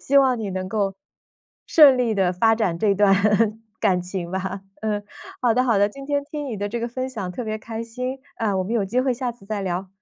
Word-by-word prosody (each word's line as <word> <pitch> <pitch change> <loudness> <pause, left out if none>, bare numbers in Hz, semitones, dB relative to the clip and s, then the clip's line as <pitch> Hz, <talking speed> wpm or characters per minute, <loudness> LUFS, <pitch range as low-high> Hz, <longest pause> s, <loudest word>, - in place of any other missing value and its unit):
希 280 - +1
望 260 -3 +5
你 210 -3 -3
能 185 0 -3
够 200 -2 -1 0.7
顺 280 -5 +7
利 235 -3 +1
地 185 -2 +2
发 225 +5 +3
展 185 -7 0
这 205 0 +3
段 200 0 +4 0.7
感 180 -2 +2
情 180 -1 -5
吧。 190 +1 -3 0.2
嗯， 210 -1 -1 0.4
好 240 -2 +4
的 250 +2 +3
好 230 -5 +3
的， 205 +1 +4
今 275 +5 -10
天 285 -1 0
听 295 -2 -4
你 230 -5 -4
的 205 +1 -2
这 235 - -3
个 235 - -2
分 255 +2 -4
享 195 -7 -5
特 245 - -4
别 215 -1 -3
开 225 +1 -6
心， 250 +3 -5 0.2
啊， 205 -4 0
我 185 - +1
们 195 - -4
有 225 -4 +1
机 240 +6 0
会 260 0 +1
下 245 0 -3
次 230 -4 -19
再 205 0 -3
聊。 185 0 -3
220 Hz, 260 characters per minute, -23 LUFS, 195-250 Hz, 0.7 s, 顺